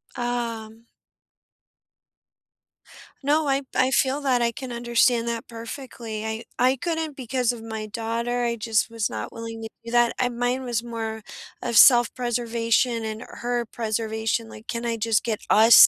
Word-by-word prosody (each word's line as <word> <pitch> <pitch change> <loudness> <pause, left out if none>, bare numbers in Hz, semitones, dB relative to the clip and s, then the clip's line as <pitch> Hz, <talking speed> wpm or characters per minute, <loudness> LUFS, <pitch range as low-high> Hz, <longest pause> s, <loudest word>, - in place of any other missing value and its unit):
Ah. 235 -2 -2 2.5
No. 300 +2 +2
I 275 0 +2
I 255 0 +3
feel 265 +2 +2
that, 260 -3 +2
I 235 0 +2
can 255 +2 -7
understand 235 0 +2
that 235 0 -3
perfectly. 230 -2 -6
I 220 +1 -3
I 255 +2 +4
couldn't 320 +1 -2
because 250 -1 0
of 240 -2 -7
my 220 -1 -5
daughter, 230 +3 -2
I 235 -1 +1
just 220 -1 +1
was 225 -2 -1
not 110 +1 -5
willing 230 0 -7
to 225 - -5 0.2
do 230 - -6
that. 240 -1 +4
I 250 - +2
mine 245 +2 -1
was 240 -2 -1
more 225 -2 -4 0.4
of 235 -2 0
self 240 0 +8
preservation 235 -1 +1
and 220 +1 -4
her 240 0 -2
preservation, 220 0 -2
like, 220 +1 -12
"Can 235 0 -3
I 230 -1 0
just 225 0 +2
get 220 -3 -1
us 225 +2 +9
235 Hz, 160 wpm, -25 LUFS, 225-245 Hz, 2.5 s, us